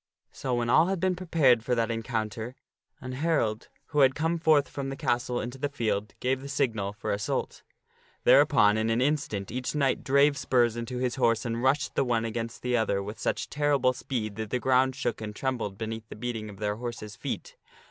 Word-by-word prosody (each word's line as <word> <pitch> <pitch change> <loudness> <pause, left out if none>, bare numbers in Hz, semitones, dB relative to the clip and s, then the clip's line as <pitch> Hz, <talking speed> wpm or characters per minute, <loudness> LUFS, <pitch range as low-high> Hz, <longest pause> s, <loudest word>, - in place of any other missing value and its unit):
So 130 -2 -2
when 120 -1 0
all 155 +8 +5
had 190 -1 -1
been 185 +1 +1
prepared 155 -10 +3
for 125 +1 0
that 115 -1 0
encounter, 115 0 -3 0.5
an 130 - -6
herald, 130 -6 0 0.2
who 150 - 0
had 135 -1 +5
come 165 +2 0
forth 155 -3 +4
from 135 -1 -5
the 135 - -4
castle 120 -1 -1
into 125 +3 -5
the 145 +1 -1
field, 105 -6 -2
give 130 +1 0
the 140 - -8
signal 115 -8 0
for 105 - -4
assault. 100 0 -2 0.6
Thereupon 105 +1 +5
in 110 +1 0
an 115 +1 +2
instant, 130 -8 -1
each 125 +3 -3
knight 135 -3 +1
drave 140 +1 +4
spurs 120 -3 +2
into 120 +2 -4
his 125 -1 -1
horse 115 -3 +2
and 115 0 -2
rushed 135 +3 +1
the - - +2
one 115 -3 0
against 115 0 -4
the 125 0 +1
other, 100 -4 +1
with 105 +2 -7
such - - -1
terrible 140 -3 +2
speed 120 -4 -4
that 110 -1 -4
the 125 - 0
ground 130 +1 +3
shook 120 -4 -2
and 105 -1 -6
trembled 120 -7 -2
beneath 110 0 -5
the - - -8
beating 110 -1 -4
of 100 - -11
their 105 0 -2
horses' 115 -3 -6
feet. - - -5
120 Hz, 205 wpm, -28 LUFS, 110-135 Hz, 0.6 s, all